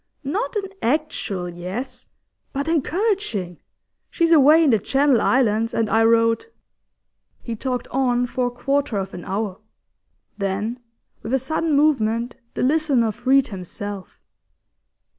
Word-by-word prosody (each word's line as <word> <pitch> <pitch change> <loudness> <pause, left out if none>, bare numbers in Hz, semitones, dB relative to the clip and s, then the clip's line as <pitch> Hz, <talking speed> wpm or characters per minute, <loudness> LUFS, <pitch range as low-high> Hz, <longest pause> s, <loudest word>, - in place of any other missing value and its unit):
Not 390 - -2
an 395 -2 -2
actual 240 - -1
yes, 185 +10 -6 0.5
but 280 +2 -2
encouraging! 330 - -1 0.5
She's 335 -1 +1
away 310 +1 +7
in 295 - +4
the 220 - +3
Channel 270 +3 +2
Islands, 230 -3 +2
and 225 - +1
I 225 0 +4
wrote 230 - +3 0.5
' - - -49
He 235 - -4
talked 250 +1 -3
on 245 -2 +1
for 245 0 -1
a - - -1
quarter 275 0 -1
of 195 0 -4
an 175 - -7
hour. 195 0 -3 0.8
Then, 200 +5 -2 0.4
with 235 +4 -1
a - - +4
sudden 315 +4 -1
movement, 240 -5 +1 0.2
the - - -1
listener 275 -5 +2
freed 260 +4 +2
himself. 195 0 -7
245 Hz, 135 wpm, -22 LUFS, 215-285 Hz, 0.8 s, away